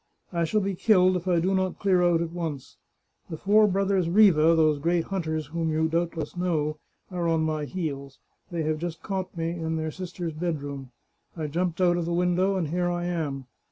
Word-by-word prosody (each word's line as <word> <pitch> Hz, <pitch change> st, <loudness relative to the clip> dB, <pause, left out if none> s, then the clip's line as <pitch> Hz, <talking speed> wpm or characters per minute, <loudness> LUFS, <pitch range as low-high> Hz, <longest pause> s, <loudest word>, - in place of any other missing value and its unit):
I 170 Hz, -1 st, +1 dB
shall 215 Hz, +6 st, +1 dB
be 195 Hz, 0 st, -1 dB
killed 185 Hz, -1 st, +4 dB
if 180 Hz, 0 st, -3 dB
I 175 Hz, -2 st, +3 dB
do 185 Hz, +3 st, +1 dB
not 190 Hz, -1 st, 0 dB
clear 190 Hz, -3 st, +2 dB
out 175 Hz, -1 st, +3 dB
at 165 Hz, -, -5 dB
once. 160 Hz, -6 st, -5 dB, 0.5 s
The 160 Hz, -, -5 dB
four 210 Hz, +5 st, +4 dB
brothers 195 Hz, -2 st, +1 dB
Riva, 190 Hz, -4 st, +6 dB
those 155 Hz, -2 st, +3 dB
great 170 Hz, +2 st, +1 dB
hunters 160 Hz, -5 st, -3 dB
whom 165 Hz, +3 st, -2 dB
you 160 Hz, +1 st, +1 dB
doubtless 165 Hz, -1 st, -2 dB
know, 155 Hz, -4 st, -1 dB, 0.3 s
are 175 Hz, -2 st, -1 dB
on 165 Hz, -1 st, +2 dB
my 155 Hz, -1 st, -1 dB
heels. 140 Hz, -6 st, -5 dB, 0.3 s
They 170 Hz, -2 st, -2 dB
have 155 Hz, 0 st, -1 dB
just 165 Hz, -1 st, -5 dB
caught 190 Hz, -2 st, -4 dB
me 165 Hz, 0 st, -1 dB
in 165 Hz, -1 st, -3 dB
their 160 Hz, 0 st, -2 dB
sister's 175 Hz, -1 st, -5 dB
bedroom. 145 Hz, -5 st, -4 dB, 0.5 s
I 160 Hz, -, -3 dB
jumped 170 Hz, +3 st, -2 dB
out 175 Hz, -1 st, +4 dB
of 170 Hz, -, -1 dB
the 170 Hz, -, -2 dB
window, 180 Hz, +2 st, +2 dB
and 170 Hz, -5 st, -1 dB
here 175 Hz, +2 st, 0 dB
I 175 Hz, 0 st, -2 dB
am. 150 Hz, -6 st, -3 dB
170 Hz, 200 wpm, -26 LUFS, 160-180 Hz, 0.5 s, Riva